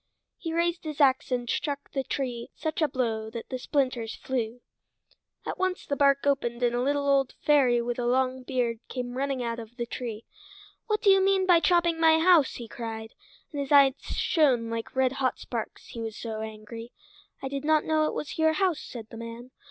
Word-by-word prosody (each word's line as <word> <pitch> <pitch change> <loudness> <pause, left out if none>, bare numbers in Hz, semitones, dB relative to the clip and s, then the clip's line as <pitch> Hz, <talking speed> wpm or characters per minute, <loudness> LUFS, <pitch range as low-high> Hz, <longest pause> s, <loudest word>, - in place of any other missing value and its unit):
He 330 - -4
raised 340 +1 0
his 305 -2 -6
ax 265 -2 +3
and 245 -1 -1
struck 285 +3 -2
the 270 - -1
tree 245 -4 -3
such 315 0 -3
a 310 - +4
blow 225 -5 -2
that 230 0 -7
the 255 - -4
splinters 255 -5 -1
flew. 245 -2 -3 0.8
At - - -4
once 370 0 -1
the 285 - -1
bark 275 0 +3
opened 250 -4 0
and 240 -1 +3
a 240 - 0
little 285 +2 0
old 275 -2 +2
fairy 255 -5 +4
with 240 +1 -3
a 240 - 0
long 260 +1 +1
beard 245 -3 -1
came 245 -1 -4
running 270 -1 -1
out 235 0 -3
of 230 +1 -10
the 240 - -2
tree. 230 -2 -6 0.6
"What 425 -1 0
do 400 - +7
you 385 0 +5
mean 385 -1 +3
by 355 -2 +6
chopping 340 +1 +3
into - - -6
my 320 0 +6
house?" 325 -4 +5
he 235 - -7
cried; 225 -2 -6 0.4
and 290 -3 -3
his 275 - -5
eyes 280 -2 +7
shone 255 -9 +2
like 230 +2 -5
red 260 -1 +3
hot 265 -2 -1
sparks, 230 -3 -6
he 230 - -7
was 225 -2 -5
so 220 -2 -5
angry. 220 +2 -8 0.5
"I - - -1
did 275 +1 -4
not 310 0 +3
know 310 -1 +2
it - - -3
was 300 - -5
your 315 0 +4
house," 360 -3 +1
said 230 -3 -8
the 225 - -8
man. 230 +2 -8
260 Hz, 210 wpm, -27 LUFS, 235-300 Hz, 0.8 s, do